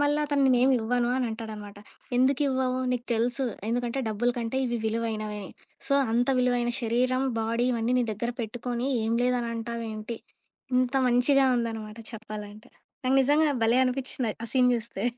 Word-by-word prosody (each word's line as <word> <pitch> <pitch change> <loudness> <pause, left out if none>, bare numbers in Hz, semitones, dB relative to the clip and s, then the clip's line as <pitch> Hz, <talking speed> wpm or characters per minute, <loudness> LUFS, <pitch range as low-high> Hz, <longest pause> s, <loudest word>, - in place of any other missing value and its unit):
మళ్ళ 290 0 +2
అతను 285 -1 +1
నేనేమివ్వను 245 -1 +3
అని 255 -1 0
అంటాడన్నమాట. 215 -2 -7 0.4
ఎందుకివ్వవు 260 -1 +2
నీకు 245 -1 -3
తెలుసు 245 +4 0 0.2
ఎందుకంటే 245 +2 -1
డబ్బుల 220 +3 +1
కంటే 235 +3 -2
ఇవి 240 -1 -1
విలువైనవని. 215 -2 -2 0.4
సో, 275 - +2 0.2
అంత 245 +2 +2
విలువైన 245 -1 +2
శరీరం 255 +3 +1 0.2
బాడీ 230 +2 0
ఇవన్నీ 235 +1 0
నీ 245 - +2
దగ్గర 235 +4 -3
పెట్టుకొని 240 +2 -3
ఏం 225 +1 0
లేదని 245 -1 +1
అంటావేంటి? 230 -1 -5 0.6
ఇంత 255 0 +2 0.2
మంచిగా 265 +3 +4
ఉందనమాట 225 -2 -4
చెప్పాలంటే. 215 -1 -9 0.3
నాకు 260 +1 +3
నిజంగా 295 +3 +3
భలే 230 +3 +4
అనిపిచింది! 255 -3 -2
ఆ - - -4
సీన్ 250 -1 +5
జూస్తే. 225 -3 -4
240 Hz, 140 wpm, -27 LUFS, 225-255 Hz, 0.6 s, సీన్